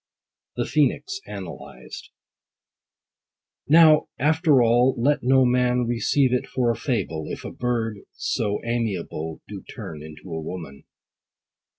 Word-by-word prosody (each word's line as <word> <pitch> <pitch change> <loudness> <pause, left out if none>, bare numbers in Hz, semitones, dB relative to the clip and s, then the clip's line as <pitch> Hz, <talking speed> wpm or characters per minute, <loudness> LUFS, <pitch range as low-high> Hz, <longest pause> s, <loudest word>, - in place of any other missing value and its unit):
THE - - -1
PHOENIX 390 +1 0
ANALYSED. - - -9 1.6
Now, 155 0 +6
after 150 -1 +3
all, 120 +3 +3
let 140 +5 +2
no 130 +1 +4
man 125 0 +2
Receive 120 +3 +1
it 125 - 0
for 120 -2 +1
a - - -2
fable, 100 - -2
If - - -6
a - - -5
bird 115 -4 -2
so 105 -2 -1
amiable 95 -9 -3
Do - - -8
turn 75 -2 -9
into 75 0 -11
a 80 - -3
woman. 80 -4 -8
120 Hz, 120 wpm, -24 LUFS, 100-130 Hz, 1.6 s, Now